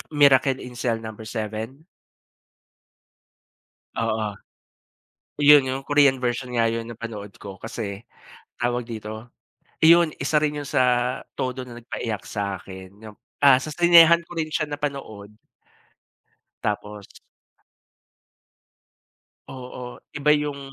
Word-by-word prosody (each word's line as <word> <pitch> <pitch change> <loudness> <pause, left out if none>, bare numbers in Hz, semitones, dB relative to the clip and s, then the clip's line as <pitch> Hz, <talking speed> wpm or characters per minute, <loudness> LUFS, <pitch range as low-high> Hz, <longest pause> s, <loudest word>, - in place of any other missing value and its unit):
Miracle 135 -2 +5
in 125 -1 -10
Cell 115 -3 0
Number 110 0 -8
7? 110 +5 -5 2.1
Oo, 110 -1 -1 1.1
yun 145 -1 +8
yung 130 +1 -3
Korean 145 -3 +4
version 125 0 -2
nga 115 -1 +2
yun 115 0 -2
napanood 110 -3 -7
ko. 100 -1 -9
Kasi, 110 -2 -6 0.5
tawag 120 0 -1
dito, 110 +1 -7 0.5
yun 170 0 +6
isa 150 +2 +1
rin 150 -1 0
yun 145 - -8
sa 125 0 +1 0.2
todo 130 0 -2
na 120 -1 -11
nag 120 - -13
nagpaiyak 110 -5 -4
sakin 95 -1 -6
yung 110 -1 -11 0.3
ah, 130 -2 +7
sa 155 - -6
sinehan 170 0 +6
ko 175 - -12
rin 160 -2 -2
siya 155 0 -1
napanood. 135 -8 -6 1.3
Tapos. 105 0 -4 2.4
Oo, 125 -1 -9 0.2
iba 150 +1 +3
yung. 145 -1 -3
125 Hz, 115 wpm, -24 LUFS, 110-145 Hz, 2.4 s, yun